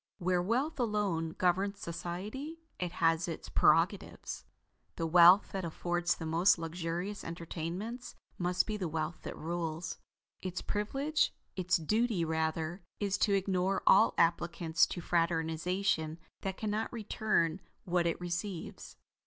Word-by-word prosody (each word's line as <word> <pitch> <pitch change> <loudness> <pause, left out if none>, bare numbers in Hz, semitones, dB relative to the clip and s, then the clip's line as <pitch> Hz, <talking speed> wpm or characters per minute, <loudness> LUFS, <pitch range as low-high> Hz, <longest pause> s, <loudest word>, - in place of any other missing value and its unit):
Where 180 -1 +1
wealth 255 - 0
alone 200 -8 0
governs 190 +3 +1
society 205 - -5 0.2
it 180 -1 -2
has 165 -1 +2
its 165 - -6
prerogatives. - - +2 0.5
The 165 - -2
wealth 175 +4 +7
that 190 -1 -3
affords 175 +1 0
the 165 - -6
most 165 +5 +4
luxurious 170 +4 -4
entertainments 175 +8 -5 0.2
must 180 0 +2
be 215 -1 -2
the 185 -4 -2
wealth 160 +1 -3
that - - -7
rules. 165 0 -3 0.4
Its 185 -1 -3
privilege 275 +9 0 0.2
its 185 -1 +2
duty 210 +2 +1
rather 160 +2 -1 0.2
is 200 -2 0
to 200 -2 +3
ignore 190 0 0
all 215 +4 +6
applicants 170 0 +2
to 175 - -5
fraternization 165 0 0 0.2
that 190 -1 -3
cannot 215 +1 -2
return 210 -6 0 0.2
what 175 -1 +2
it 165 - -1
receives. 175 +1 -5
175 Hz, 130 wpm, -32 LUFS, 165-200 Hz, 0.5 s, wealth